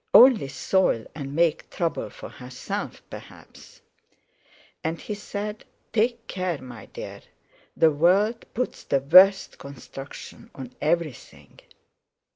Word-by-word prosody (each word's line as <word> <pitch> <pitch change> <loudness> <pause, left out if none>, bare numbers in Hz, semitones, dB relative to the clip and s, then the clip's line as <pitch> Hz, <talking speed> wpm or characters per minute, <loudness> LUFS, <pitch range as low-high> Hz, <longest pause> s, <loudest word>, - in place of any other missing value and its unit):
Only 240 - +8
soil 135 -2 +1
and 140 -2 -6
make 165 -1 +1
trouble 170 -2 -2
for - - -10
herself, 125 0 -6
perhaps. - - -13 1.0
And 160 0 -2
he 210 - -5
said: 210 +1 -5 0.3
"Take 235 +1 +1
care, 180 -5 -2
my 120 -5 -10
dear! - - -8 0.6
The 160 -1 +5
world 195 +9 +3
puts 250 +2 -3
the 140 - +1
worst 185 +8 +6
construction 140 0 -10
on 130 -2 -8
everything." 155 -3 -3
170 Hz, 110 wpm, -25 LUFS, 140-205 Hz, 1.0 s, Only